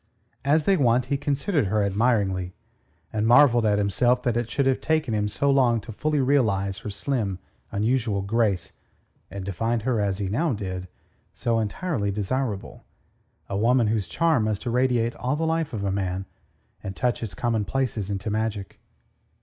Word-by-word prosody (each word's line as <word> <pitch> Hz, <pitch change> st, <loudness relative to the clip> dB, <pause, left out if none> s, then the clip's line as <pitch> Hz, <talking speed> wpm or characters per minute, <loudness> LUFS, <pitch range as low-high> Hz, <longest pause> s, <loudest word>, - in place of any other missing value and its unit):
As 150 Hz, +2 st, +2 dB
they 195 Hz, -1 st, +4 dB
went, 125 Hz, -3 st, +3 dB
he -, -, +3 dB
considered 140 Hz, -, 0 dB
her 105 Hz, +2 st, +1 dB
admiringly, 100 Hz, -4 st, 0 dB, 0.6 s
and 110 Hz, 0 st, 0 dB
marvelled 120 Hz, -3 st, +6 dB
at 105 Hz, -1 st, +3 dB
himself 120 Hz, +5 st, +2 dB
that 120 Hz, -2 st, 0 dB
it 120 Hz, -1 st, -1 dB
should 140 Hz, -, 0 dB
have 130 Hz, -1 st, +1 dB
taken 155 Hz, -7 st, 0 dB
him 105 Hz, -1 st, +1 dB
so 140 Hz, +7 st, +1 dB
long 125 Hz, -4 st, +3 dB
fully 145 Hz, +8 st, -2 dB
to 135 Hz, -, +2 dB
realize 100 Hz, -8 st, +1 dB
her 105 Hz, -, -6 dB
slim, 100 Hz, -2 st, -2 dB, 0.3 s
unusual 110 Hz, -1 st, 0 dB
grace, 100 Hz, -3 st, 0 dB, 0.6 s
and 100 Hz, -1 st, -6 dB
to 100 Hz, -, -3 dB
find 115 Hz, +3 st, -1 dB
her, 120 Hz, -3 st, +1 dB
as 100 Hz, -2 st, 0 dB
he 100 Hz, -2 st, -2 dB
now 145 Hz, -, 0 dB
did, 95 Hz, -3 st, -5 dB, 0.5 s
so 115 Hz, -1 st, 0 dB
entirely 110 Hz, -, -2 dB
desirable, 105 Hz, +1 st, -3 dB, 0.6 s
a 100 Hz, -, -4 dB
woman 115 Hz, +2 st, +3 dB
whose 105 Hz, -4 st, 0 dB
charm 155 Hz, -, +2 dB
must 110 Hz, +1 st, -2 dB
irradiate 120 Hz, -1 st, +1 dB
all 130 Hz, +3 st, -1 dB
the 160 Hz, +2 st, -1 dB
life 160 Hz, -1 st, 0 dB
of 105 Hz, -3 st, -4 dB
a 100 Hz, -, 0 dB
man, 95 Hz, -1 st, -2 dB, 0.6 s
and 95 Hz, -1 st, -6 dB
touch 125 Hz, -1 st, 0 dB
its 105 Hz, -6 st, -5 dB
commonplaces 115 Hz, -1 st, -1 dB
into 100 Hz, +1 st, -3 dB
magic. 105 Hz, -3 st, -3 dB
115 Hz, 170 wpm, -25 LUFS, 100-130 Hz, 0.6 s, marvelled